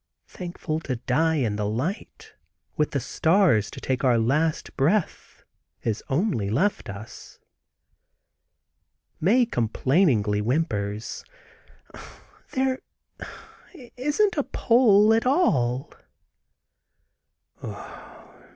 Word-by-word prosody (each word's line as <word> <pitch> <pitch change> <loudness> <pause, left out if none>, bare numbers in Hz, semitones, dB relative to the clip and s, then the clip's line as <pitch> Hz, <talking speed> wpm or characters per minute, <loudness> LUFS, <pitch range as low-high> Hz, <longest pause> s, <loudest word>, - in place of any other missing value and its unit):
Thankful 175 -3 -5
to 135 -5 -4
die 160 +7 +1
in 115 -8 -1
the 105 -1 -1
light, 135 - -4 0.4
with 150 - +1
the 140 - -1
stars 160 - +2
to - - -9
take 130 0 -2
our 125 -3 +4
last 150 +8 0
breath, 165 +8 -1 0.4
is 110 -2 -2
only 135 - 0
left 170 - 0
us. 100 +3 -10 1.8
Mae 235 +9 +4
complainingly 120 - +1
whimpers: 110 -5 -2 1.3
"There 265 0 0 1.2
isn't 295 +9 +1
a 290 - +2
pole 220 -4 +4
at 225 +2 +1
all!" 135 - +1
150 Hz, 85 wpm, -25 LUFS, -, 1.8 s, our